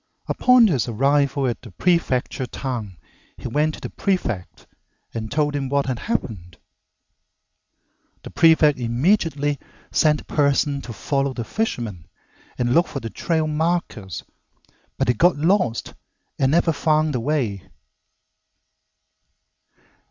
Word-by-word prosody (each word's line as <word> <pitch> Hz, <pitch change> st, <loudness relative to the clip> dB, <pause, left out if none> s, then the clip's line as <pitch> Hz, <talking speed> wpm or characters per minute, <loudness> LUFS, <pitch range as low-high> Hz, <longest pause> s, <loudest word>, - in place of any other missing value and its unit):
Upon 250 Hz, -2 st, +5 dB
his 145 Hz, -, +1 dB
arrival 140 Hz, +4 st, +1 dB
at 120 Hz, -2 st, -2 dB
the 120 Hz, -, -11 dB
prefecture 130 Hz, -, 0 dB
town 115 Hz, -8 st, -5 dB, 0.4 s
he -, -, -6 dB
went 150 Hz, +5 st, 0 dB
to -, -, -14 dB
the -, -, -6 dB
prefect 120 Hz, -, -2 dB, 0.5 s
and 110 Hz, -1 st, -4 dB
told 145 Hz, 0 st, 0 dB
him 135 Hz, -2 st, -2 dB
what 140 Hz, 0 st, +1 dB
had 130 Hz, -3 st, -2 dB
happened. 90 Hz, -, -4 dB, 1.7 s
The -, -, -9 dB
prefect 160 Hz, -4 st, +4 dB
immediately 145 Hz, -, +1 dB, 0.3 s
sent 150 Hz, -1 st, +3 dB
a -, -, -18 dB
person 140 Hz, -1 st, +1 dB
to 120 Hz, -, -8 dB
follow 140 Hz, +2 st, -1 dB
the 120 Hz, -, -3 dB
fisherman 115 Hz, -, -3 dB, 0.5 s
and 120 Hz, 0 st, +1 dB
look 170 Hz, +2 st, +4 dB
for 140 Hz, -, -5 dB
the 115 Hz, -3 st, -7 dB
trail 160 Hz, -2 st, 0 dB
markers, 155 Hz, -, -2 dB, 0.7 s
but -, -, +1 dB
they 125 Hz, -, +3 dB
got 170 Hz, +7 st, +3 dB
lost 160 Hz, -, +1 dB, 0.5 s
and 135 Hz, 0 st, +3 dB
never 165 Hz, +1 st, +3 dB
found 155 Hz, +1 st, +1 dB
the 125 Hz, -, 0 dB
way. 115 Hz, -9 st, -2 dB
140 Hz, 130 wpm, -22 LUFS, 120-155 Hz, 1.7 s, Upon